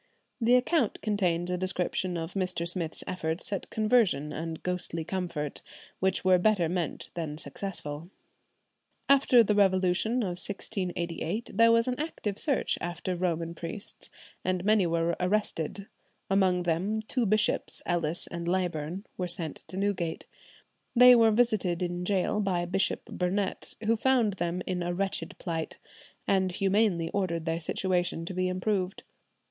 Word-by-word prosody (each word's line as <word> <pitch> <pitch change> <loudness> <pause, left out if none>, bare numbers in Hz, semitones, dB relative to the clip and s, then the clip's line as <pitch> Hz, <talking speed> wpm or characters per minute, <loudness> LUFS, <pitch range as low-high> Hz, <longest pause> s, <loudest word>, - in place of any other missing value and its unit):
The 235 +2 +5
account 250 -1 +2
contains 180 -5 0
a 180 - -1
description 185 -1 -1
of 165 +1 -5
Mr. 185 -3 -1
Smith's 170 -2 -2
efforts 170 +1 -2
at 195 - -4
conversion 215 - +2
and 160 0 -5
ghostly 180 -2 -2
comfort, 170 -5 -3 0.4
which 190 0 0
were 185 -1 +6
better 195 -3 +3
meant 175 -1 -3
than 155 -3 -4
successful. 165 -3 -6 1.0
After 265 -3 +6
the 210 - +1
revolution 195 +4 +2
of 180 -3 -2
1688 185 0 -3
there 230 +3 +6
was 230 +1 +4
an 250 +1 -1
active 220 -10 -3
search 280 -4 +1
after 175 +1 -3
Romish 170 -2 -2
priests, 170 +5 -5 0.3
and 185 0 -1
many 210 -3 +4
were 170 0 +1
arrested; 195 -1 -1 0.5
among 185 -2 +3
them 180 +6 0
two 230 +1 -1
bishops, 215 +1 +1
Ellis 170 -1 +1
and 170 0 -6
Leyburn, 175 0 -1
were 180 - -1
sent 170 -3 -2
to 185 - -7
Newgate. 190 -5 -1 0.7
They 250 +1 +9
were 230 -2 +6
visited 210 -6 +2
in 175 0 -2
gaol 195 +2 +1
by 185 -4 0
Bishop 190 +2 0
Burnet, 190 +2 -2
who 225 +2 +3
found 235 -3 +2
them 175 +1 -2
in 180 -1 -2
a 175 0 -2
wretched 195 +1 -1
plight, 165 -3 -4 0.5
and 190 -1 +2
humanely 195 -2 +1
ordered 170 -5 -1
their 165 0 -1
situation 175 0 -1
to 185 - -5
be 185 0 0
improved. 185 0 -1
185 Hz, 145 wpm, -29 LUFS, 170-205 Hz, 1.0 s, They